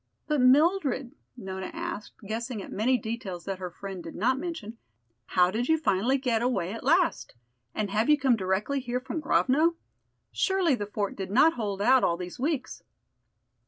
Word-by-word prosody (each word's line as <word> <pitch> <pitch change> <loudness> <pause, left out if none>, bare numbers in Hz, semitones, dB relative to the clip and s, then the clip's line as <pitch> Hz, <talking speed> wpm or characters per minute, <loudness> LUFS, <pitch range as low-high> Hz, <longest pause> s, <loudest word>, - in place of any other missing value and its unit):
"But 300 -3 +1
Mildred," 280 -1 +3 0.3
Nona 190 -4 -6
asked, 335 -9 -6
guessing 230 +2 -4
at - - -8
many 250 +5 +2
details 210 -6 -5
that 195 -1 -4
her 180 -1 -4
friend 190 0 -8
did 165 - -9
not 255 +7 +1
mention, 240 -10 -6 0.5
"how 180 0 +3
did 240 +6 -2
you 320 - +5
finally 255 -2 +1
get 245 -4 0
away 235 -7 0
at 230 - -7
last? 335 - +1 0.4
And 210 -2 -2
have 215 +6 +1
you 300 - +6
come 265 -4 +3
directly 200 +7 -1
here 245 -1 -2
from 265 +5 -5
Grovno? 305 +3 +2 0.6
Surely 380 -5 +2
the 205 -5 -2
fort 205 -1 -3
did 190 -1 -5
not 275 +10 +5
hold 205 -4 -3
out 260 +3 +5
all 170 - +2
these 180 +6 -7
weeks." 285 0 -2
240 Hz, 175 wpm, -27 LUFS, 200-280 Hz, 0.6 s, you